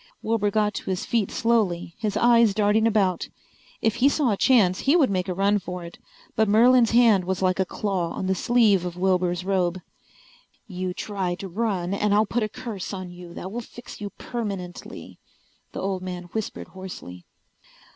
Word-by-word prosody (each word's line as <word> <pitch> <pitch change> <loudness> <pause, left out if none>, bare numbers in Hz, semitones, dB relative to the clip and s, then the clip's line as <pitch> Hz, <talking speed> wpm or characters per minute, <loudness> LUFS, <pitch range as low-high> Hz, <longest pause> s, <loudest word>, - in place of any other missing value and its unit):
Wilbur 220 -2 +1
got 210 0 +1
to - - -6
his 185 -1 -2
feet 225 -5 0
slowly, 205 -8 0
his 215 -3 -1
eyes 235 -3 +4
darting 215 +1 +3
about. 195 -5 +1 0.5
If 225 - +1
he 260 +4 +5
saw 285 -5 +1
a - - +2
chance 195 -6 +3
he 280 +4 +3
would 285 - +4
make 185 0 -1
a - - 0
run 200 +2 +2
for 180 -2 -6
it. 170 - -11 0.4
But 220 -1 +2
Merlin's 235 +2 +5
hand 230 -5 +5
was 190 +1 -2
like 185 0 +1
a 190 - +1
claw 190 -5 -2
on - - -4
the 190 - +1
sleeve 215 -3 +3
of 175 -1 -5
Wilbur's 180 -1 +1
robe. 185 -2 0 0.9
"You 185 -2 -4
try 190 -4 -3
to 195 - -7
run 190 -2 -2
and 205 0 +1
I'll 215 +1 +4
put 235 +3 -1
a 215 - -1
curse 220 -5 -6
on 185 -1 -7
you 175 -1 -11
that 185 - -6
will 240 +3 -4
fix 240 0 -12
you 205 - -4
permanently," 195 -5 -7 0.5
the - - -6
old 190 -1 -2
man 180 -1 -5
whispered 220 -2 -4
hoarsely. 180 - -9
195 Hz, 185 wpm, -24 LUFS, 185-225 Hz, 0.9 s, he